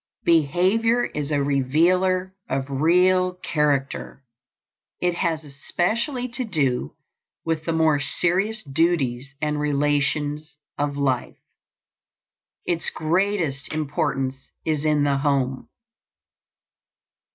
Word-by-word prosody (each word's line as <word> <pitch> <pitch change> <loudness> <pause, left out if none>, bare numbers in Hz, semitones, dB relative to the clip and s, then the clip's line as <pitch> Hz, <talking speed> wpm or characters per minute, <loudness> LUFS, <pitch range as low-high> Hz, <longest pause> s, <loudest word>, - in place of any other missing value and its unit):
Behavior 185 - +3
is 150 -1 -4
a 145 -2 +1
revealer 180 +7 +2 0.2
of 135 0 -1
real 180 +5 +3
character. 145 -6 -1 0.8
It 180 0 +1
has 165 -2 -1
especially 220 - -1
to 245 +2 -2
do 135 - -1 0.5
with 160 -1 -1
the 165 - 0
more 160 -2 +3
serious 190 - +1
duties 140 -4 0
and 150 0 0
relations 145 +1 0 0.2
of 145 -1 -2
life. 135 -3 -1 1.3
Its 170 -2 0
greatest 165 -4 -1
importance 135 -3 -2 0.2
is 155 -1 -1
in 150 -1 +3
the 140 -1 +2
home. 135 -2 0
150 Hz, 95 wpm, -23 LUFS, 140-180 Hz, 1.3 s, Behavior